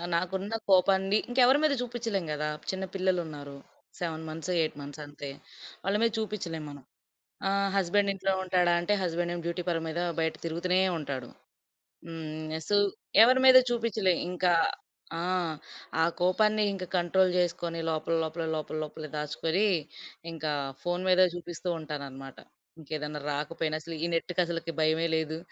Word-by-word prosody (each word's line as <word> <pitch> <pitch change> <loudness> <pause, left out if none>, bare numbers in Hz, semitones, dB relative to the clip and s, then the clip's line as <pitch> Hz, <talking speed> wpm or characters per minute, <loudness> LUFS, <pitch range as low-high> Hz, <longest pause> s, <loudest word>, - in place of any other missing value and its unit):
నాకున్న 190 +5 -1
కోపాన్ని 190 +2 +4
ఇంకెవరి 255 +2 +5
మీద 305 -2 +4
చూపిచ్చలేం 230 -6 -2
కదా! 150 0 -1 0.2
చిన్న 190 0 -3
పిల్లలున్నారు. 165 -7 -2 0.4
7 160 -2 -3
మంత్స్, 165 +3 -4
8 155 - -1
మంత్స్ 145 +1 -8
అంతే. 145 -1 -8 0.5
వాళ్ళ 195 +2 +1
మీద 230 - +3
చూపిచ్చలేం 185 -7 -3
మనం. 145 -2 -11 0.6
ఆహ్, 200 0 +2
హస్బెండ్ 200 +2 +2
ఇంట్లో 195 0 0
ఉంటాడా 180 -1 +3
అంటే, 175 +4 +1
హస్బెండేమో 175 0 -1
డ్యూటీ 170 +1 -2
పని 165 -1 0
మీద, 160 +2 -3 0.2
బయట 160 -1 0
తిరుగుతునే 175 +3 +1 0.2
ఉంటాడు. 135 -4 -5 0.8
హ్మ్. 155 -1 -6
య - - -1
సు 205 - +4 0.5
ఎవరి 255 +3 +6
మీదా 255 0 +10
చూపిచ్చలే. 220 -5 +1 0.2
ఇంక 180 0 -2 0.8
ఆ! - - -2 0.8
ఆ - - +6 0.2
కోపాన్ని 210 +4 +3
ఇంక 190 -2 -5
కంట్రోల్ 180 +1 +3
జేసుకొని, 170 -1 0
లోపల 160 +1 -1
లోపల, 160 +1 -3
లోపల, 155 0 -4
లోపలే 155 0 -7
దాచుకొని, 160 +6 0 0.6
ఇంకా 155 -2 -3 0.3
ఫోన్ 175 0 -1
మదే 185 0 +6
చూపిస్తూ 175 +1 -5
ఉంటాననమాట. 140 -3 -7 0.4
ఇంకేదన్నా 150 -1 -4
రాకపోయినా 155 +2 -2
అసలు 165 +1 -7
ఈ - - +3
నెట్‌కి 175 +2 0
అసలకి 165 -1 -3
భయమే 160 +1 +2
లేదు. 160 0 -1
170 Hz, 140 wpm, -29 LUFS, 155-190 Hz, 0.8 s, మీదా